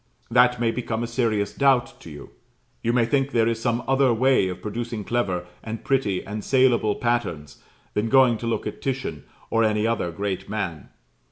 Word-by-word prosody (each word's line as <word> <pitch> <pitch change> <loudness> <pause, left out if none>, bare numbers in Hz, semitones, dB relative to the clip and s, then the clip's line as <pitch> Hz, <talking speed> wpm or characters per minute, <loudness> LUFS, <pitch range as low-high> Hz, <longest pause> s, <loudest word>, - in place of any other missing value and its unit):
That 125 0 +4
may 115 -1 +2
become 115 -1 -3
a - - -2
serious 115 -4 0
doubt 135 -3 +2
to - - -11
you. 75 -2 -11 0.5
You 115 - +1
may 120 -1 +3
think 135 +3 +1
there 115 -4 +2
is 115 -1 -1
some 120 0 0
other 135 -1 +3
way 125 -3 +3
of 90 - -5
producing 115 0 -4
clever, 95 -6 -1 0.2
and 110 0 -6
pretty, 115 -9 0
and 105 +1 -5
saleable 125 -5 +3
patterns 100 - -2 0.3
than 105 +2 0
going 130 -3 +5
to 115 - -4
look 115 - -1
at - - -6
Titian, 135 -1 -3 0.3
or 115 0 +3
any 105 0 +1
other 115 -6 0
great 100 +1 -4
man. 90 -9 -4
115 Hz, 185 wpm, -24 LUFS, 105-125 Hz, 0.5 s, going